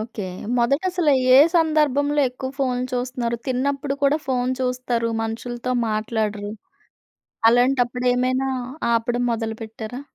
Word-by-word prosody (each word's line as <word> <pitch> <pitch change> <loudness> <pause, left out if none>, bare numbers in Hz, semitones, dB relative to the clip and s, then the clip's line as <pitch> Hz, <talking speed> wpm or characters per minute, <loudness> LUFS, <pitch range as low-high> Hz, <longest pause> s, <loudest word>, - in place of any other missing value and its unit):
Okay. 215 -2 -5 0.3
మొదటసల 320 +7 +1 0.3
ఏ - - +9 0.2
సందర్భంలో 295 -3 +2
ఎక్కువ 260 +1 -6
ఫోన్లు 255 -2 0
చూస్తున్నారు? 245 -1 -2
తిన్నప్పుడు 275 +2 -1
కూడా 285 +2 +3
ఫోన్ 250 -1 0
చూస్తారు 250 -2 -1
మనుషులతో 240 +2 -4 0.2
మాట్లాడరు. 215 -1 -2 1.0
అలాంటప్పుడు 245 0 +2
ఏమైనా 255 +2 0 0.4
ఆపడం 240 +1 0
మొదలు 225 -1 -3
పెట్టారా? 225 +3 -7
250 Hz, 105 wpm, -22 LUFS, 230-270 Hz, 1.0 s, ఏ